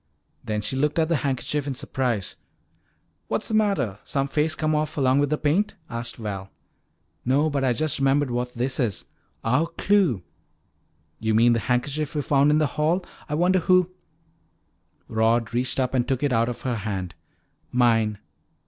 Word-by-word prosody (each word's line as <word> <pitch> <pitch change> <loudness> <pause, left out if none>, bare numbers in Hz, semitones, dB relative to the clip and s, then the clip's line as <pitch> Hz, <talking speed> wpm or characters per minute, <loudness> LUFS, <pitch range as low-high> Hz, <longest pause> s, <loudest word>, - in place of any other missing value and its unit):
Then 105 -1 -2
she 105 +5 -2
looked 150 +4 0
at 160 -1 +2
the 165 - +3
handkerchief 140 +1 -2
in 135 - -2
surprise. 125 -7 -2 0.9
"What's - - -1
the - - -2
matter? 200 - +1
Some 135 -1 -1
face 150 +3 +1
come 155 0 0
off 155 0 -1
along 135 -1 +3
with 145 -1 +2
the 150 - +1
paint?" 170 +9 +1 0.2
asked 115 0 -4
Val. 100 -4 -5 0.7
"No. 145 +5 +2
But 140 -1 0
I 130 - +3
just 155 +3 0
remembered 135 0 +2
what 125 +1 -2
this 125 +3 -1
is 115 -7 -1 0.4
our 130 +9 +2
clue!" 170 - +1 1.0
"You 110 -1 0
mean 120 +2 +5
the 115 - +1
handkerchief 140 +6 -1
we 145 - 0
found 140 +1 +3
in 150 - +4
the 155 - +3 0.2
hall? 175 +4 +1 0.2
I 150 - -1
wonder 180 +3 +3
who 185 +1 +3 0.6
" - - -45
Rod 115 +1 +1
reached 125 +2 0
up 130 -1 0
and 125 -2 +1
took 135 0 -1
it 140 -3 +2
out 115 +1 +2
of 120 - -6
her 125 -3 -1
hand. 95 -5 -4 0.6
"Mine. 115 -4 +3
135 Hz, 175 wpm, -24 LUFS, 115-150 Hz, 1.0 s, mean